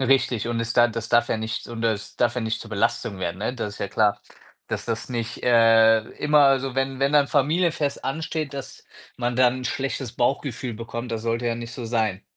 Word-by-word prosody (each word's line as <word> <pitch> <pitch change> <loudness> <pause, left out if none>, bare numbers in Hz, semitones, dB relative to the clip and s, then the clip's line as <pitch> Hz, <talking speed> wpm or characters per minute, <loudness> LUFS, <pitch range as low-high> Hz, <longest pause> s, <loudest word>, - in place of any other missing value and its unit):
Richtig, 130 -3 +2
und 120 - -1
es 115 0 -1
da 120 0 +5
das 115 +1 -5
darf 120 0 +4
ja - - 0
nicht 110 +1 -4
und 115 -1 -6
das 110 -2 -2
darf 120 0 +2
ja 125 - -2
nicht 110 -1 -2
zur 110 - -10
Belastung 110 -1 -1
werden, 90 0 -3
ne, 110 +4 -2
das 105 -4 -4
ist - - -13
ja 100 - -3
klar, 105 -2 +2 0.5
dass - - -4
das 115 +2 -3
nicht, 120 -1 -4
äh, 115 -2 +6 0.2
immer 150 0 +3
also, 135 -1 +2
wenn 135 0 -1
wenn 140 +1 +1
dann 145 -1 +5
'n - - -17
Familienfest 155 0 +1
ansteht, 155 +1 -3
dass 135 -2 -8 0.3
man 120 0 -1
dann 130 0 +4
'n - - -7
schlechtes 135 -2 -3
Bauchgefühl 125 -1 -1
bekommt, 115 +2 -6
das 115 - -2
sollte 115 +1 -1
ja 115 - +1
nicht 120 +1 -7
so 120 - -6
sein. 110 -4 -1
120 Hz, 225 wpm, -24 LUFS, 115-135 Hz, 0.5 s, äh